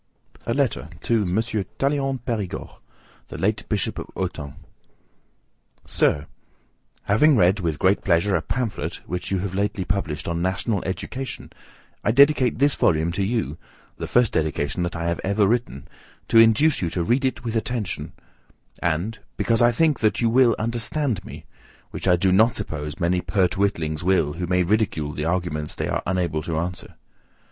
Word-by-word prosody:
TO - - 0 0.2
M. 100 -5 +2
TALLEYRAND 130 +5 -1
PERIGORD, 105 -6 -3 0.6
LATE - - -2
BISHOP - - -1
OF - - -7
AUTUN. 80 -6 -4 1.3
Sir: 70 +1 +1 0.8
Having 135 +8 +4
read 95 +2 +4
with 80 -5 -1
great 95 +2 +2
pleasure 90 +2 +2
a 85 - +1
pamphlet, 125 +1 -3
which 90 +1 -4
you 95 - 0
have 95 -1 -4
lately 100 -1 -1
published, 85 -5 -2
on 85 0 -2
National 95 +3 -1
Education, 130 +7 -5 0.5
I - - +1
dedicate 135 -1 +4
this 140 +2 +3
volume 80 -2 +2
to 95 +3 -1
you, 100 -7 -2 0.4
the - - -5
first 120 -3 +2
dedication 75 0 -1
that 85 0 -2
I 85 - -3
have 85 0 -1
ever 100 +2 +2
written, 115 - -1 0.4
to 115 - +6
induce 115 +8 +5
you 85 - 0
to 85 +1 -2
read 120 +10 +1
it 130 -1 -1
with 115 -1 -3
attention; 115 -2 -2 0.7
and, 85 +7 -1 0.2
because 115 0 +2
I 120 0 +6
think 155 +3 +2
that 110 -1 +1
you 115 -1 +2
will 125 -1 +5
understand 115 - -2
me, - - -10 0.5
which - - -5
I 90 - +6
do 95 +2 +2
not 110 +5 +4
suppose 75 -6 -5
many 90 +1 +1
pert 95 -2 +1
witlings 85 -6 -1
will, 85 -5 +2
who 90 +2 -4
may 90 +1 +2
ridicule 90 -6 0
the 75 +1 -3
arguments 85 -3 -2
they - - -2
are - - -1
unable 90 -4 0
to 80 -1 -3
answer. 90 +2 -4
95 Hz, 160 wpm, -23 LUFS, 85-115 Hz, 1.3 s, to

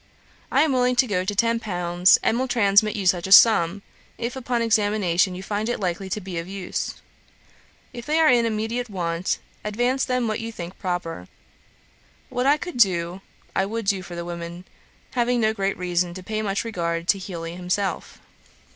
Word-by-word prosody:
I - - +4
am 310 -3 +1
willing 250 0 +2
to 245 - +4
go 190 -6 -1
to 205 +2 -3
ten 230 +2 +2
pounds, 180 -3 +3
and 235 - +2
will 260 - 0
transmit 215 -2 +3
you 200 -3 -3
such 180 0 +2
a - - -7
sum, 195 -3 +6 0.3
if 235 +1 -4
upon 245 -2 -1
examination 205 -5 +2
you 185 - -7
find 210 +3 -2
it 240 - -2
likely 190 0 -3
to 210 - -2
be 185 -3 -5
of 165 - -6
use. 195 -1 -4 1.0
If 240 0 -8
they 305 +1 +1
are 320 -1 +5
in 235 -2 +3
immediate 225 +2 -2
want, 175 -2 -2 0.3
advance 245 +5 0
them 250 -2 0
what 215 - -2
you 230 0 -5
think 180 -3 -8
proper. 175 - -4 1.0
What 250 +2 -1
I 290 +2 +5
could 350 -2 -7
do, 180 -4 +2 0.3
I 190 - +1
would 225 +1 -4
do 195 -1 +1
for 175 -1 -9
the 170 0 -5
women, 170 +1 -7 0.5
having 245 0 +1
no 220 -1 +2
great 195 -2 -1
reason 175 -1 -1
to 185 - -8
pay 215 +3 -3
much 200 -2 -1
regard 170 -6 -3
to 195 - +4
Heely 170 -3 -6
himself. 180 +1 -2
200 Hz, 190 wpm, -23 LUFS, 180-230 Hz, 1.0 s, sum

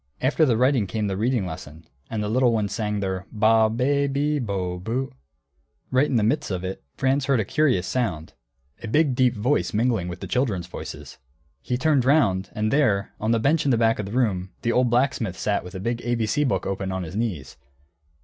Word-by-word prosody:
After 150 +4 +2
the 115 -3 +2
writing 125 -4 +2
came 105 +3 -2
the 100 -2 -1
reading 115 0 0
lesson, 80 -2 -8 0.2
and 110 -2 -2
the - - -2
little 120 +3 +3
ones 105 -3 -1
sang 105 -3 -2
their 95 -1 -3
ba, 110 +1 +4
be, 140 +5 +1
bi, 145 +2 0
bo, 90 -4 -3
bu. 120 +8 -3 0.8
Right 130 +3 +3
in 130 - -1
the 110 - +3
midst 110 - 0
of 90 -2 -3
it, 95 -6 -5
Franz 135 +1 +1
heard 135 -4 +2
a 110 - 0
curious 130 -8 +1
sound, 90 -6 -2 0.5
a - - -6
big 145 +4 +2
deep 125 -1 +2
voice 105 -5 0
mingling 115 -5 +1
with 90 0 -6
the - - -6
children's 110 -9 -1
voices. 90 - -9 0.4
He 125 - -2
turned 140 0 +2
round, 100 -10 +2
and 110 -1 -1
there, 110 -9 +2
on 110 - -2
the 115 - +3
bench 150 +7 +2
in 145 - +1
the 120 - +3
back 115 -1 +2
of 105 - -3
the - - -7
room, 105 -7 0
the 115 - +1
old 125 0 +2
blacksmith 120 -6 0
sat 105 -1 -1
with 90 +2 -10
a - - -4
big 115 +4 -2
ABC 120 +4 0
book - - -1
open 95 0 -3
on 95 0 -3
his 85 +3 -7
knees. 95 - -3
115 Hz, 215 wpm, -24 LUFS, 95-130 Hz, 0.8 s, ba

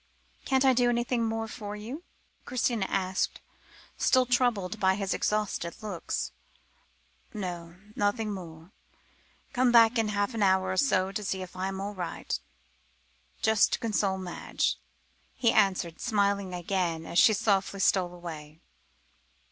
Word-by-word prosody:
"Can't 265 0 +2
I 265 - +6
do 245 0 +3
anything 240 0 0
more 225 0 -2
for 210 -2 -6
you?" 235 +9 -7 0.4
Christina 240 -6 0
asked, 190 -1 -1 0.6
still 255 0 +4
troubled 235 -6 +1
by 190 -1 +3
his 195 -1 -1
exhausted 210 -5 -1
looks. 200 -5 -3 1.0
"No, 175 -4 -5 0.2
nothing 210 +1 0
more. 165 -2 -9 0.8
Come 250 -1 +3
back 230 0 +6
in 220 - +1
half 205 +3 -1
an 225 - -3
hour 190 -1 +3
to 195 -3 +1
see 190 -1 -2
if 185 - -11
I 185 +1 -2
am 190 0 -4
all 200 +1 -4
right 180 -3 -4 1.0
just 220 -1 +4
to - - +1
console 205 -4 0
Madge," 185 -2 -2 0.6
he 230 -2 +3
answered, 190 -5 +2
smiling 200 -3 +1
again, 175 -2 -2
as 170 - +1
she 220 - +7
softly 200 -2 +1
stole 185 -2 +2
away. 160 -3 -9
200 Hz, 135 wpm, -28 LUFS, 185-225 Hz, 1.0 s, she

